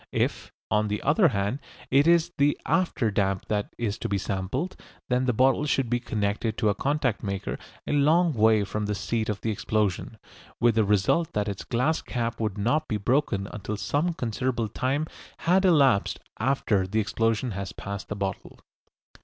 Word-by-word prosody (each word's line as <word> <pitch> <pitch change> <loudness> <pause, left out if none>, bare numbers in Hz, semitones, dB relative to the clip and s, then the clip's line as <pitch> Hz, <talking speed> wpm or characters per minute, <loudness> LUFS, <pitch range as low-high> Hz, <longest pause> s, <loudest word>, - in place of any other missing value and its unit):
If, - - -1 0.2
on 105 0 +2
the 105 0 -2
other 165 +6 +4
hand, 105 0 -1 0.3
it 140 +4 +5
is 170 0 +4
the 145 +1 +3
after 170 - +1
damp 95 -1 0
that 105 -1 -2
is 110 -3 -2
to - - -3
be 100 - +1
sampled, 100 - -3 0.3
then 125 +1 +2
the 125 - +3
bottle 130 +5 +3
would 130 -4 -1
be 120 - +2
connected 110 -1 -2
to 110 - +2
a - - +3
contact 135 0 0
maker 100 -2 -3 0.3
a - - -2
long 155 +4 +4
way 110 -2 +4
from 105 +1 -3
the 105 - -1
seat 110 +3 -2
of 105 -2 -3
the 115 - -1
explosion, 105 0 -1 0.4
with 120 0 +4
the 110 0 +3
result 105 - +2
that 105 0 0
its 100 -2 -4
glass 130 +7 0
cap 115 -2 -3
would 110 -3 -2
not 120 +10 +1
be 110 - -1
broken 105 -3 0
until 105 +1 -4
some 160 +10 0
considerable 120 -2 -2
time 135 +8 -1 0.3
had 185 +3 +2
elapsed 140 - +4 0.2
after 110 -6 +1
the 110 +4 0
explosion 115 +3 0
has 100 -1 -4
passed 100 -1 -6
the 105 - -3
bottle. 100 -1 -4
115 Hz, 180 wpm, -26 LUFS, 105-135 Hz, 0.4 s, it